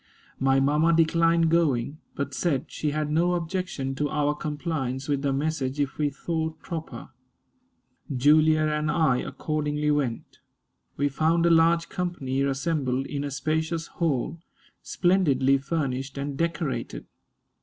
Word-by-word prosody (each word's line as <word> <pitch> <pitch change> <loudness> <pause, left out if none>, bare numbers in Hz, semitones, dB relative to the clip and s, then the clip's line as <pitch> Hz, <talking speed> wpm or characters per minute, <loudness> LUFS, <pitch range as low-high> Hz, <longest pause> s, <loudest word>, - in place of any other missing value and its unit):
My 135 0 +3
mamma 150 +4 +3
declined 165 0 +3
going, 150 -4 +1 0.2
but 140 0 -3
said 140 -1 -1
she 150 - -2
had 150 0 -2
no 175 +3 +2
objection 170 -5 -3
to 145 +2 -1
our 150 -1 +1
compliance 145 -3 -3
with 140 -2 0
the 140 -1 0
message 140 -1 -1
if 140 0 -2
we 150 -1 +2
thought 160 +2 -3
proper. 160 -5 -7 1.0
Julia 155 +4 +4
and 150 0 0
I 155 -7 +3
accordingly 150 +1 -2
went. 135 -6 -2 0.6
We 145 - +2
found 160 +4 +1
a 170 - +4
large 165 +1 +4
company 170 -8 -2
assembled 135 -1 0
in 140 0 -4
a 145 - -3
spacious 160 +4 -1
hall, 160 -1 -2 0.4
splendidly 140 -8 +2
furnished 135 -2 -3
and 140 0 -3
decorated. 150 -6 -2
150 Hz, 135 wpm, -26 LUFS, 135-165 Hz, 1.0 s, Julia